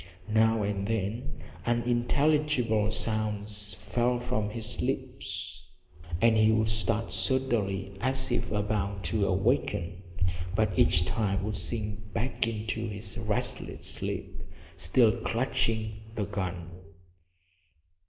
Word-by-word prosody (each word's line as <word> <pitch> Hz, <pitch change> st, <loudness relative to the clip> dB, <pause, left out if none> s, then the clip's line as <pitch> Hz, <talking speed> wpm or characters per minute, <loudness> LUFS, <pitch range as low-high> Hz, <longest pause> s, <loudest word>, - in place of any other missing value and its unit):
Now 110 Hz, 0 st, +4 dB
and 100 Hz, -1 st, -1 dB
then 110 Hz, +2 st, -2 dB, 0.2 s
unintelligible 120 Hz, -1 st, +2 dB
sounds 105 Hz, -1 st, -2 dB
fell 120 Hz, +4 st, +1 dB
from 110 Hz, -3 st, -1 dB
his 110 Hz, +1 st, -3 dB
lips, -, -, -3 dB, 0.6 s
and 115 Hz, +1 st, +5 dB
he 110 Hz, 0 st, +6 dB
would 110 Hz, 0 st, +3 dB
start 110 Hz, +1 st, -1 dB
suddenly 105 Hz, -8 st, 0 dB
as 130 Hz, +1 st, 0 dB
if 120 Hz, -1 st, 0 dB
about 100 Hz, -2 st, 0 dB
to 100 Hz, +4 st, +2 dB
awaken, 95 Hz, -4 st, +1 dB, 0.5 s
but 110 Hz, -1 st, +2 dB
each 85 Hz, 0 st, +4 dB
time 100 Hz, -2 st, 0 dB
would 105 Hz, 0 st, -1 dB
sink 105 Hz, +1 st, -4 dB
back 115 Hz, 0 st, 0 dB
into 110 Hz, 0 st, -2 dB
his 100 Hz, -1 st, -5 dB
restless -, -, -3 dB
sleep, -, -, -4 dB, 0.3 s
still 110 Hz, +5 st, +4 dB
clutching 115 Hz, -3 st, 0 dB, 0.2 s
the 105 Hz, -, 0 dB
gun. 90 Hz, -4 st, -3 dB
110 Hz, 110 wpm, -29 LUFS, 100-115 Hz, 0.6 s, he